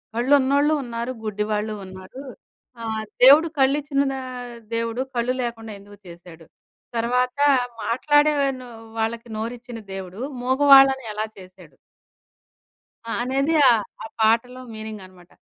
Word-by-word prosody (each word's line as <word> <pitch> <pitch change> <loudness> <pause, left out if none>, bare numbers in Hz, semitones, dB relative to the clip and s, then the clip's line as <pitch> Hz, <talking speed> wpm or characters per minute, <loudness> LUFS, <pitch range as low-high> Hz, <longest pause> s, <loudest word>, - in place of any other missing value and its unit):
కళ్ళు 245 +4 +2
ఉన్నోళ్ళూ 285 +3 +2
ఉన్నారు, 235 0 -4
గుడ్డి 210 -1 -2
వాళ్ళూ 210 +1 -1
ఉన్నారు. 190 +7 -11 0.6
ఆహ్, 220 -1 -3 0.2
దేవుడు 290 +5 +8
కళ్ళు 270 +2 +4
ఇచ్చిన 280 -1 -1
ద - - -4 0.6
దేవుడు 230 +2 -2
కళ్ళు 240 +1 0
లేకుండా 225 -2 -6
ఎందుకు 205 +1 -16
చేశాడు? 170 -1 -13 0.5
తర్వాత 250 +3 0 0.5
మాట్లాడే 295 +5 +3 0.3
ను 250 - -11 0.3
వాళ్ళకి 230 +1 -2
నోరు 230 +2 -3
ఇచ్చిన 240 -1 -9 0.2
దేవుడు, 190 +1 -8 0.2
ముగవాళ్ళని 270 0 +6
ఎలా 215 +1 -2
చేశాడు? 185 -3 -15 1.3
ఆ! 230 - -8
అనేది 275 +5 0 0.2
ఆహ్, 225 -3 +3 0.2
ఆ - - -6 0.2
పాటలో 235 +3 +2
మీనింగనమాట. 190 -5 -10
235 Hz, 125 wpm, -23 LUFS, 210-265 Hz, 1.3 s, దేవుడు